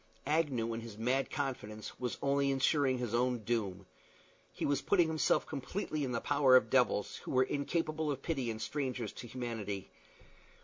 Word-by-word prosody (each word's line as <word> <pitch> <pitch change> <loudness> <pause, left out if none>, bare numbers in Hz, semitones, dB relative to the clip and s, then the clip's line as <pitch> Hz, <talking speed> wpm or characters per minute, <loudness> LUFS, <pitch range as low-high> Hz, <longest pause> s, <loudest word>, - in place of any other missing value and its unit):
Agnew, 135 -7 +1
in 115 - -4
his 115 -2 -9
mad 125 +4 +1
confidence, 125 -6 -4
was 125 -1 -2
only 140 0 +2
insuring 135 0 +2
his 120 -3 -3
own 125 +1 +2
doom. 105 -5 -1 0.7
He - - -3
was 140 -1 +1
putting 175 -4 +3
himself 160 -1 +2
completely 155 +2 -3
in 130 - -2
the 120 - 0
power 140 -2 +4
of 130 - +5
devils, 125 -6 +2
who - - -10
were 130 0 +4
incapable 155 +3 -1
of 140 -2 -3
pity 135 -8 -1
and 110 -1 -4
strangers 125 -4 -3
to 120 - -8
humanity. 115 -6 -4
130 Hz, 170 wpm, -33 LUFS, 115-145 Hz, 0.7 s, of